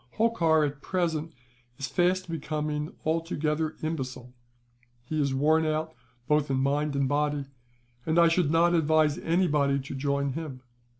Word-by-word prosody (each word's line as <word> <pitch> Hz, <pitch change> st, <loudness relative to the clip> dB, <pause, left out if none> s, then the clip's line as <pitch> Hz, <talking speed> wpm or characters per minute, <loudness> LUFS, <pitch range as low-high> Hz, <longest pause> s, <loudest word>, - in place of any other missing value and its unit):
"Holkar, 165 Hz, -9 st, +3 dB
at 145 Hz, 0 st, -5 dB
present, 165 Hz, -3 st, -1 dB, 0.5 s
is 135 Hz, -, -3 dB
fast 180 Hz, +8 st, +1 dB
becoming 150 Hz, -1 st, -3 dB
altogether 160 Hz, -1 st, -1 dB
imbecile. 130 Hz, -5 st, -4 dB, 0.7 s
He 155 Hz, +4 st, -1 dB
is 140 Hz, -2 st, 0 dB
worn 155 Hz, +4 st, +3 dB
out 155 Hz, 0 st, -1 dB, 0.3 s
both 150 Hz, -1 st, +2 dB
in 135 Hz, -, +1 dB
mind 140 Hz, +2 st, 0 dB
and 140 Hz, -1 st, +1 dB
body, 145 Hz, 0 st, 0 dB, 0.6 s
and 160 Hz, +5 st, 0 dB
I 170 Hz, 0 st, +7 dB
should 165 Hz, -2 st, +2 dB
not 170 Hz, +2 st, +3 dB
advise 155 Hz, -2 st, +3 dB
anybody 150 Hz, -5 st, +2 dB
to 140 Hz, 0 st, -6 dB
join 140 Hz, 0 st, -1 dB
him. 140 Hz, -4 st, -6 dB
150 Hz, 140 wpm, -27 LUFS, 140-165 Hz, 0.7 s, I